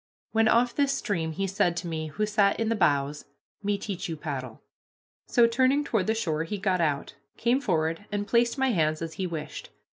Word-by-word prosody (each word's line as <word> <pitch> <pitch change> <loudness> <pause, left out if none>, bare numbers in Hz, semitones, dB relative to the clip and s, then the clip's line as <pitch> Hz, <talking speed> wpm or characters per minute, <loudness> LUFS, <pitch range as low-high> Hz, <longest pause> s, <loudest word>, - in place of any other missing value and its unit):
When 225 0 +3
off 235 +2 +3
this 280 -1 +2
stream 170 -7 -2
he 195 +5 -1
said 190 -3 +1
to 175 - -3
me, 160 -1 -3
who 210 +8 -1
sat 205 -1 +2
in 225 -1 0
the 230 - +2
bows, 145 -6 +1 0.4
"Me 205 0 0
teach 195 -4 -5
you 160 - -4
paddle." 135 -6 -6 0.6
So, 240 - +5
turning 260 +5 +3
toward 220 -8 0
the 220 - +2
shore, 160 -8 -1
he 205 +5 -4
got 190 -2 +1
out, 145 -4 -1 0.2
came 245 +4 +2
forward, 165 - 0
and 205 0 -1
placed 235 +4 +2
my 265 -1 +2
hands 155 -4 +1
as 165 -1 -5
he 185 - 0
wished. 155 -3 -6
195 Hz, 205 wpm, -27 LUFS, 160-225 Hz, 0.6 s, So